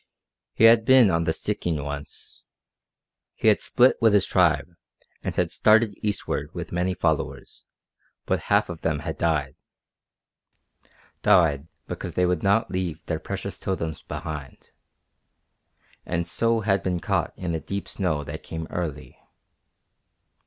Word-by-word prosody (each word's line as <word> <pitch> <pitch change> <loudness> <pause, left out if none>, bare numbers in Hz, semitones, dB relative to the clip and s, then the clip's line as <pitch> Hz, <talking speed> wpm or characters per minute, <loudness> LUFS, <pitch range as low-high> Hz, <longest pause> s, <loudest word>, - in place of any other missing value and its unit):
He - - +1
had 115 0 +7
been 130 -4 +6
on 85 0 +1
the 80 - +2
Stikine 80 -5 -2
once. 70 0 -8 0.9
He 110 - +3
had 105 - +3
split 125 +1 +3
with 110 -2 +5
his 100 -1 +4
tribe, 90 -1 +2 0.5
and - - -3
had - - 0
started 110 0 +4
eastward 105 -1 -2
with - - -6
many 90 +1 -1
followers, 80 -4 -2 0.6
but - - 0
half - - +3
of - - -8
them - - -1
had - - -4
died 75 -5 0 1.7
died 80 -8 +3 0.2
because - - -6
they 90 - +3
would 90 -2 0
not 100 +4 +2
leave 90 -4 -3
their 80 -2 -2
precious 100 +4 -6
totems 80 -5 -3
behind 75 -4 -7 1.3
and 85 0 -2
so 115 -1 +1
had 100 -2 +1
been 90 -2 -1
caught - - -1
in 90 -2 -3
a 80 - -1
deep 100 +4 -5
snow 80 -7 -2
that - - -7
came 80 0 -6
early. 80 -5 -5
90 Hz, 140 wpm, -25 LUFS, 80-105 Hz, 1.7 s, had